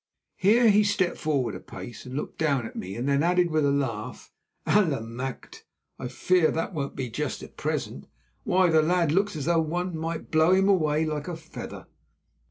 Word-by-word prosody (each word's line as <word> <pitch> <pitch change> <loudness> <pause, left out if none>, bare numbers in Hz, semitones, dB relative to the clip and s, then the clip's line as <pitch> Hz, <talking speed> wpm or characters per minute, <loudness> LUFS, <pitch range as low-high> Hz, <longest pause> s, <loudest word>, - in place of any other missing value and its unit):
Here 220 +3 +5
he 210 +1 +5
stepped 205 -3 0
forward 140 -6 0
a - - -6
pace 120 0 -10
and 125 - -7
looked 145 - -5
down 140 -6 +1
at - - -9
me, 95 +4 -5
then 140 +3 +1
added 175 +1 +2
with 155 -1 +2
a - - +3
laugh, 130 -7 -3 0.3
"Allemachte! 135 - -1 0.4
I - - -4
fear 160 +7 +2
that 165 +4 -2
won't 140 -4 -4
be 130 -2 -3
just 135 +4 -4
at - - -12
present. - - -3 0.4
Why, 180 -1 +3
the 160 -1 +5
lad 170 -1 +2
looks 195 +3 +1
as 150 - -4
though 165 0 +3
one 175 +3 -2
might 165 0 -4
blow 160 +3 +4
him 190 +1 +4
away 160 -5 +2
like 150 -2 -3
a 175 - -3
feather." 160 0 -9
160 Hz, 185 wpm, -26 LUFS, 140-180 Hz, 0.4 s, Here